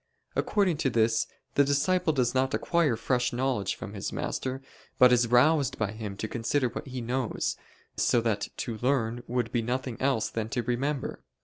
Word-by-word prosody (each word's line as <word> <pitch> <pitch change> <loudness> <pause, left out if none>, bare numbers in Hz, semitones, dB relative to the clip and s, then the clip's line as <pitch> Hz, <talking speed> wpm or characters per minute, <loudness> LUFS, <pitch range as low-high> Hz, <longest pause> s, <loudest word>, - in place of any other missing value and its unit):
According 190 -6 +1
to 145 -3 +1
this, 115 -1 +2 0.3
the 140 - +5
disciple 160 +5 +2
does 125 -5 +1
not 130 0 +1
acquire 165 -8 +2
fresh 125 +2 0
knowledge 125 -5 -1
from - - -8
his - - -4
master, 130 0 -3 0.4
but 125 0 +7
is 120 -1 +3
roused 135 +3 +4
by 105 -2 -1
him 105 -2 -6
to 110 - -3
consider 120 +4 0
what - - -7
he 130 -1 -5
knows; 125 +1 -1 0.4
so 120 - +3
that 110 -3 0
to 115 -2 -4
learn 120 -2 0
would 120 -1 -1
be 120 - +1
nothing 125 +1 -3
else 130 -5 +1
than 110 -1 -3
to 120 +1 -1
remember. 130 +4 -2
125 Hz, 180 wpm, -28 LUFS, 115-135 Hz, 0.4 s, but